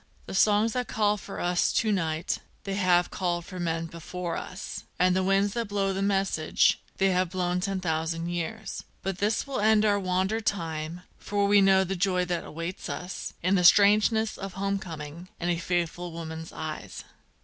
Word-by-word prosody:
The - - -7
songs 210 +3 +4
that 250 -1 -1
call 210 -1 +2
for 200 -1 -8
us 175 0 +2
to 220 -2 +2
night, 165 -4 -1 0.2
they 195 - -3
have 180 -2 +3
called 175 -2 -1
for 185 -1 -8
men 165 -1 -1
before 170 +1 -5
us, 185 - -6
And 180 0 +3
the 190 - +2
winds 195 +1 +2
that 235 -2 -2
blow 200 -1 0
the 190 - -2
message, 195 -5 +2 0.2
they 195 0 +3
have 180 -1 +1
blown 180 0 -1
ten 195 +1 -1
thousand 165 0 -1
years; 175 +6 -4 0.2
But 195 -1 -3
this 210 +2 +1
will 275 -1 -3
end 215 0 +4
our 205 -1 +3
wander 190 +4 0
time, 165 -4 -3 0.2
for 205 0 0
we 200 0 +5
know 190 0 +5
the 190 +1 -2
joy 180 0 +1
that 175 -1 -3
waits 165 +4 -5
us 180 +1 -5
In 185 +2 +2
the 180 -2 +3
strangeness 215 +3 +5
of 195 -1 -5
home 195 +1 -1
coming, 165 0 -8
and 175 0 0
a 170 - 0
faithful 175 0 -2
woman's 160 0 -7
eyes. 155 -11 -6
185 Hz, 185 wpm, -27 LUFS, 170-200 Hz, 0.2 s, we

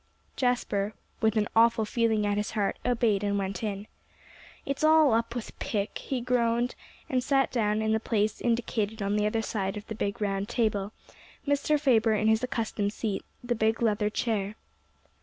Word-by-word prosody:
Jasper, 215 -5 0 0.3
with 220 0 +2
an 210 -1 +2
awful 230 -1 +4
feeling 220 -1 +1
at 205 0 +1
his 210 +1 -1
heart, 200 -2 0
obeyed 230 -5 +1
and 200 0 0
went 195 -1 -3
in. 205 -2 -3 0.8
"It's 275 +2 -3
all 310 -4 +6
up 230 +1 0
with 240 - -6
Pick," 205 -2 -2
he 260 -3 -3
groaned, 240 0 +1 0.3
and 255 -1 0
sat 270 0 +2
down 215 -3 +1
in 220 - +1
the 220 - +2
place 215 -1 0
indicated 225 -3 -1
on 200 +1 0
the 210 0 +2
other 225 +1 -1
side 195 -2 -2
of 210 - -7
the - - -6
big 205 +1 -3
round 200 -1 -1
table, 210 -4 0 0.5
Mr. 285 +1 +2
Faber 230 -6 +3
in 215 +1 +1
his 220 0 +4
accustomed 220 -4 -1
seat, 210 -4 -3 0.2
the 245 0 0
big 220 0 +1
leather 210 -2 +1
chair. 210 -2 -1
220 Hz, 175 wpm, -28 LUFS, 210-240 Hz, 0.8 s, all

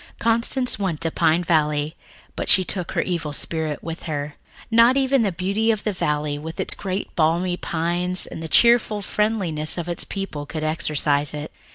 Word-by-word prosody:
Constance 235 +2 +1
went 185 -6 -2
to 165 -1 +1
Pine 165 +3 +2
Valley, 150 -2 +1 0.4
but - - -3
she 185 +3 +7
took 180 -1 -4
her - - +1
evil 170 -4 -3
spirit 155 +1 -3
with 165 0 -6
her. 145 -1 -3 0.4
Not 230 +3 +5
even 270 -1 +2
the 205 -3 +1
beauty 195 +6 -1
of 215 -2 +1
the 210 - -1
valley, 150 -4 -1
with 160 +2 -8
its - - +2
great 190 0 -5
balmy 170 +3 +1
pines, 175 +2 +1
and - - -8
the 165 - -5
cheerful 225 +1 +4
friendliness 190 -9 0
of 175 -1 -4
its 175 -1 -1
people 175 -8 -5
could 155 0 -5
exorcise 150 -2 0
it. 150 +1 -6
170 Hz, 180 wpm, -22 LUFS, 155-200 Hz, 0.4 s, she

